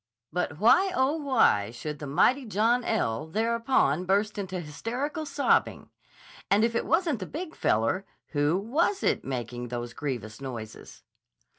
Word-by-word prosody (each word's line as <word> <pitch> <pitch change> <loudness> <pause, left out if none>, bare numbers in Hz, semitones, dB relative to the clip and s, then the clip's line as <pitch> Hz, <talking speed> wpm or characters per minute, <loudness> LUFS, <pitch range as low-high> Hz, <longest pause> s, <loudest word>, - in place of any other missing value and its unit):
But 175 -4 -2
why, 305 - +5
oh, 265 +2 +2
why, 245 - +3
should 145 +6 -6
the 145 - -6
mighty 250 - +3
John 230 +3 +1
L. 155 - -1
thereupon 225 - +1
burst 205 +3 +1
into 190 -2 -4
hysterical 245 - -4
sobbing? 285 - +1 0.6
And 205 +2 +4
if 230 0 +2
it 230 - -1
wasn't 325 - +1
the 185 - -5
Big 325 +1 -6
Feller, 115 - +1 0.2
who 145 +3 +1
was 300 - 0
it - - +1
making 120 -2 -4
those 120 0 -5
grievous 120 -6 -5
noises? 115 -5 -8
195 Hz, 145 wpm, -27 LUFS, -, 0.6 s, why